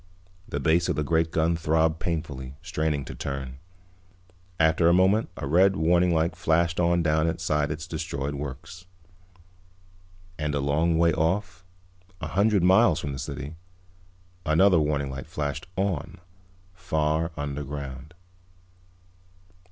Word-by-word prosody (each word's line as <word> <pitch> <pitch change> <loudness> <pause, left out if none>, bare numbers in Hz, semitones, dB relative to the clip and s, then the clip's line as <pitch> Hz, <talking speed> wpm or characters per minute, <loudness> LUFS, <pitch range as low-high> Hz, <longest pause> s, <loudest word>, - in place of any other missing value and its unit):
The 70 - -2
base 80 +4 +2
of - - +1
the 75 - -1
great 80 +2 +1
gun 80 +1 +1
throbbed 80 0 +1
painfully, 70 -6 -4
straining 80 -5 -1
to - - -7
turn. 65 -1 -5 1.0
After 80 +1 +4
a - - +5
moment 95 +4 +3
a - - -4
red 95 +7 +4
warning 90 +1 +3
light 80 0 +1
flashed 85 +1 +1
on 85 0 +2
down 80 0 +2
inside 75 -2 0
its 80 +2 -5
destroyed 80 -5 -4
works. 70 +6 -8 1.5
And 75 -1 -1
a - - 0
long 80 +4 +1
way 85 0 +3
off, 95 +4 -1 0.6
a - - -5
hundred 100 -1 +2
miles 95 -1 +5
from 70 -2 -4
the 65 - -6
city, 75 +4 -6 0.9
another 85 +3 +4
warning 75 -2 -1
light 65 +1 -7
flashed 70 0 -4
on, 95 -6 -2 0.6
far 80 -2 -1
underground. 70 0 -6
80 Hz, 130 wpm, -26 LUFS, 75-85 Hz, 1.5 s, a